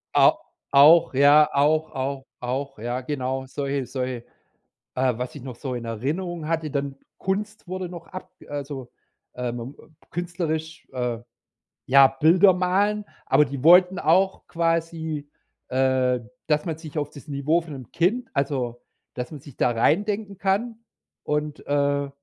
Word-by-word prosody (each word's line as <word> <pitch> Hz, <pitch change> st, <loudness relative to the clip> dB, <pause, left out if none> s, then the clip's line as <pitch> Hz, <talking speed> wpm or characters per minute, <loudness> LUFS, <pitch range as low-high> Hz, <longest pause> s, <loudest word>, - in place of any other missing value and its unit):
A -, -, +7 dB, 0.4 s
auch, 150 Hz, +4 st, +7 dB
ja, 145 Hz, +3 st, +6 dB
auch 155 Hz, +2 st, +2 dB
auch 135 Hz, 0 st, -3 dB
auch, 135 Hz, 0 st, -4 dB
ja, 120 Hz, +3 st, -3 dB
genau. 130 Hz, -1 st, -3 dB
Solche 140 Hz, 0 st, -2 dB
solche 125 Hz, -1 st, -4 dB, 0.7 s
äh, 130 Hz, 0 st, +2 dB
was 125 Hz, 0 st, -4 dB
ich 145 Hz, -, -8 dB
noch 130 Hz, -1 st, -7 dB
so 130 Hz, -1 st, -5 dB
in 120 Hz, -1 st, -5 dB
Erinnerung 155 Hz, -, -3 dB
hatte, 160 Hz, -2 st, -1 dB
dann 140 Hz, -1 st, -3 dB, 0.2 s
Kunst 210 Hz, +3 st, -3 dB
wurde 185 Hz, 0 st, -4 dB
noch 175 Hz, -1 st, -10 dB
ab 185 Hz, -, -9 dB, 0.2 s
also, 140 Hz, -3 st, -6 dB, 0.4 s
ähm, 120 Hz, +1 st, -4 dB
ähm, 155 Hz, -, -19 dB, 0.2 s
künstlerisch 160 Hz, -2 st, -3 dB
äh, 125 Hz, -3 st, -2 dB, 0.7 s
ja, 135 Hz, 0 st, +8 dB
Bilder 170 Hz, +8 st, +5 dB
malen, 195 Hz, +4 st, +1 dB, 0.2 s
aber 150 Hz, -, +4 dB
die 140 Hz, -1 st, -6 dB
wollten 180 Hz, +2 st, +7 dB
auch 190 Hz, +5 st, +2 dB
quasi, 165 Hz, -3 st, -1 dB, 0.4 s
äh, 130 Hz, -1 st, +2 dB, 0.3 s
dass 150 Hz, -1 st, +1 dB
man 165 Hz, -3 st, -3 dB
sich 155 Hz, -1 st, -9 dB
auf 145 Hz, -1 st, -3 dB
das 145 Hz, 0 st, -13 dB
Niveau 145 Hz, +3 st, +1 dB
von 160 Hz, -3 st, -9 dB
'nem 130 Hz, -4 st, -10 dB
Kind 210 Hz, +9 st, 0 dB
also, 130 Hz, -4 st, -1 dB, 0.4 s
dass 125 Hz, -1 st, -5 dB
man 150 Hz, -, -8 dB
sich 140 Hz, -4 st, -14 dB
da 125 Hz, -, +2 dB
reindenken 200 Hz, -, 0 dB
kann 210 Hz, +5 st, -1 dB, 0.4 s
und, 150 Hz, 0 st, -3 dB
äh, 140 Hz, 0 st, +1 dB
145 Hz, 150 wpm, -24 LUFS, 130-170 Hz, 0.7 s, ja